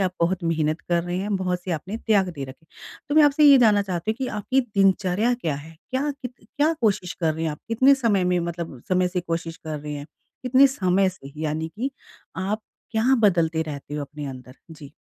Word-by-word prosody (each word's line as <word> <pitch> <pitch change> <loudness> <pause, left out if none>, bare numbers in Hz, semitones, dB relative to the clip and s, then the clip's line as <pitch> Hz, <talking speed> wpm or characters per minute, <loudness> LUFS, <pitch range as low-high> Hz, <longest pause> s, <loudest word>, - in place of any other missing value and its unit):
आप 185 -2 +1
बहुत 175 +2 +1
मेहनत 155 -1 0
कर 170 -1 0
रहे 175 +1 -3
हैं, 200 +1 -2
बहुत 180 -1 -1
से 185 - -5
आपने 185 +7 -4
त्याग 205 -5 +2
दे 145 -6 -5
रखे 135 +5 -12
हैं। - - -37 0.4
तो 290 - -1
मैं 310 - +7
आपसे 295 +1 +4
ये 280 -2 +9
जानना 215 -4 +5
चाहती 185 0 -2
हूँ 220 - -2
कि 260 +1 -3
आपकी 255 +6 +1
दिनचर्या 200 -1 +2
क्या 165 - -2
है? 155 +3 -10 0.2
क्या 270 +3 0
कित 255 -3 -8 0.2
क्या 300 +3 +3
कोशिश 200 -5 +1
कर 160 -2 +1
रहे 160 - -3
हैं 160 - 0
आप 150 - -7
कितने 260 +5 +5
समय 220 -8 +1
में 180 - +2
मतलब 170 -6 -5
समय 185 -1 +2
से 180 0 -2
कोशिश 165 -1 -4
कर 155 -2 -6
रहे 150 +1 -6
हैं? 145 0 -7 0.4
कितने 260 +2 +6
समय 190 0 +3
से 140 -7 -10
यानी 160 +1 -2
कि 245 +10 -4 0.6
आप 215 +2 -2 0.3
क्या 240 +4 +3
बदलते 165 -6 +3
रहते 145 -2 -7
हो 150 - -2
अपने 145 +1 -8
अंदर? 130 -2 -9 0.2
जी। 150 -3 -12
180 Hz, 225 wpm, -24 LUFS, 160-220 Hz, 0.6 s, ये